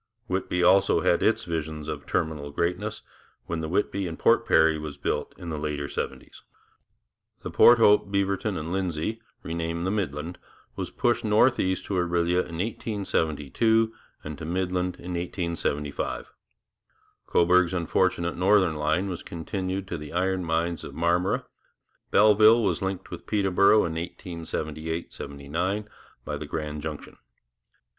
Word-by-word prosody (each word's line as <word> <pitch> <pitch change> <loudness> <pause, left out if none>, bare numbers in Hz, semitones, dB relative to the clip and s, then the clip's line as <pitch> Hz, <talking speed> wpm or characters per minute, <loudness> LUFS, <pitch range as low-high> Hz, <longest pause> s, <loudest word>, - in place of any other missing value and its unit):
Whitby 90 -3 -1
also 95 +2 +5
had - - +2
its - - +2
visions 80 -2 -4
of 75 -2 -5
terminal 80 -3 -1
greatness, 90 +8 -2 0.4
when 85 -1 -3
the 80 - -4
Whitby 100 +1 0
and 80 - -6
Port - - +3
Perry 80 -1 +4
was 75 -2 -6
built - - -2
in 85 - -7
the 75 - -3
later 75 -1 -3
seventies. 65 -2 -6 1.0
The - - -5
Port 120 - +7
Hope, 105 -3 +4
Beaverton 100 0 0
and 80 +2 -4
Lindsay, 95 +3 -2 0.2
renamed 85 +1 -3
the 95 - 0
Midland, 85 -4 -3 0.4
was - - -4
pushed 120 - 0
northeast 105 -3 +2
to - - -4
Orillia 85 -1 +1
in 85 -2 -3
1872 105 - 0 0.3
and 75 -1 -7
to - - -7
Midland 90 +1 -1
in 90 0 -7
1875. 85 -4 -3 0.9
Cobourg's 90 0 +4
unfortunate 85 0 0
northern 95 -3 +3
line 80 +5 +1
was 90 -3 -4
continued 95 +3 -4
to 85 -4 -4
the 75 0 -9
iron 95 +1 0
mines 85 +1 -1
of - - -8
Marmora. 85 +3 +1 0.6
Belleville 110 +2 +6
was 100 - 0
linked 95 -1 -4
with - - -8
Peterborough 100 +1 +4
in 80 - -3
1878 80 -1 -5
79 85 +9 -3 0.4
by - - -3
the - - -7
Grand 75 -1 -4
Junction. 75 -1 -7
85 Hz, 140 wpm, -26 LUFS, 80-95 Hz, 1.0 s, Port